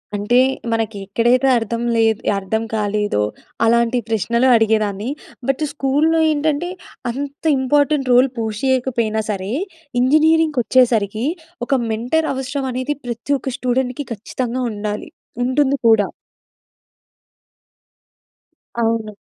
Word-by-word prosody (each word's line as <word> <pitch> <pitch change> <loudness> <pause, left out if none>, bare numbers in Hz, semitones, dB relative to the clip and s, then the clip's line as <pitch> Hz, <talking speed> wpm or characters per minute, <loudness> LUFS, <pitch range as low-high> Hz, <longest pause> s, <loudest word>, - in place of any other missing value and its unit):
అంటే 210 +5 +2 0.3
మనకి 225 -2 -1
ఎక్కడైతే 240 +6 +2
అర్థం 230 +1 -2
లే‌ద్ 225 -2 +3 0.2
అర్థం 220 +3 -2
కాలేదో 210 - 0 0.4
అలాంటి 235 +1 +3
ప్రశ్నలు 235 +4 +1
అడిగేదాన్ని. 215 -1 +1 0.4
బట్ 270 +3 0
స్కూల్లో 295 +4 +2
ఏంటంటే 305 +3 0 0.4
అంత 280 +4 -6 0.2
ఇంపార్టెంట్ 285 +1 +2
రోల్ 250 +2 +5
పుష్ 220 -2 -3
చేయకపోయినా 240 -4 +1
సరే, 195 -1 -3 0.5
ఇంజినీరింగ్‌‌కొచ్చేసరికి 255 -7 +3 0.4
ఒక 275 - 0 0.2
మెంటర్ 250 +9 0
అవసరం 265 +1 -3
అనేది 255 +4 -2
ప్రతి 235 +4 -2
ఒక్క 260 0 -4
స్టూడెంట్‌కీ 255 +1 -1
ఖచ్చితంగా 245 +3 -4
ఉండాలి. 210 0 -4 0.4
ఉంటుంది 275 +2 +2
కూడా. 220 -3 +5 2.7
అవును. 225 -2 -1
240 Hz, 100 wpm, -19 LUFS, 220-270 Hz, 2.7 s, రోల్